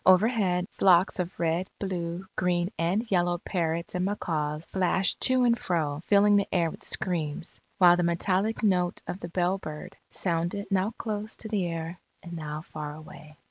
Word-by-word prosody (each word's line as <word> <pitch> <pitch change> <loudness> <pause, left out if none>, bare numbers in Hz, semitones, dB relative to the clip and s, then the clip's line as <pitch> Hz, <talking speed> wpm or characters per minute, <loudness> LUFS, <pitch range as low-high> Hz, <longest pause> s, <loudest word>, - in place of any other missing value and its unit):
Overhead, 185 -2 +4
flocks 185 0 +5
of 180 0 -3
red, 170 +3 0
blue, 180 -2 -3
green, 175 0 0
and 185 +7 +1
yellow 175 -1 +2
parrots 170 -2 -2
and 180 0 -1
macaws 155 -6 -2
flashed 190 0 +2
to 255 -1 +3
and 235 -1 +4
fro 155 -8 -1
filling 205 0 +5
the 200 - +1
air 170 -3 +1
with - - -10
screams; 165 -2 -1 0.2
while 175 -2 +7
the - - +1
metallic 185 +6 0
note 180 -4 +1
of 180 - -5
the 170 - -6
bellbird, 175 -3 -2 0.2
sounded 175 +3 -1
now 195 +1 +2
close 215 0 -4
to 220 - -6
the 205 -4 0
ear 165 +1 -4 0.2
and 175 - -8
now 155 -1 -5
far 150 -2 -7
away. 155 -1 -13
180 Hz, 165 wpm, -27 LUFS, 165-195 Hz, 0.2 s, while